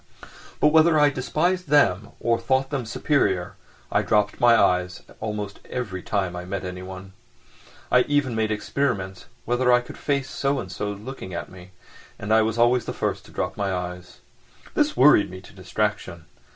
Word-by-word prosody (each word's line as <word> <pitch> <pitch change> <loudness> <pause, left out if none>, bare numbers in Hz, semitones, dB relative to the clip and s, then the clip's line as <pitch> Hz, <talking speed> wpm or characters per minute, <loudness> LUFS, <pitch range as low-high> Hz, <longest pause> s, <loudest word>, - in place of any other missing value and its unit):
But 150 - +5
whether 160 +1 +5
I 145 -1 +5
despised 175 +7 -1
them 110 -8 +3
or 115 0 +1
thought 130 +3 0
them 135 -5 -3
superior 100 - 0 0.4
I - - +3
dropped 105 -1 +1
my 120 -1 +7
eyes 90 0 +1 0.2
almost 105 -2 -5
every 100 -7 -4
time 95 -3 -2
I 90 - -5
met 95 +1 -5
anyone. 95 +1 -8 0.8
I 125 - +6
even 145 -4 +1
made 110 -1 0
experiments 105 -4 -2 0.2
whether 125 +1 +2
I 125 0 +5
could 125 - -12
face 140 -2 -1
so 140 0 0
and - - -6
so's 105 -1 -4
looking 105 -6 -8
at - - -5
me, 90 -1 -13 0.5
and 105 +1 -1
I 110 - +6
was 110 +1 -1
always 120 +1 +3
the - - -4
first - - -3
to - - -15
drop - - -3
my 100 -1 -1
eyes. 90 0 -6 0.5
This - - +1
worried 130 -4 +6
me 95 +1 -9
to - - -16
distraction. 95 -3 -3
110 Hz, 175 wpm, -24 LUFS, 95-130 Hz, 0.8 s, my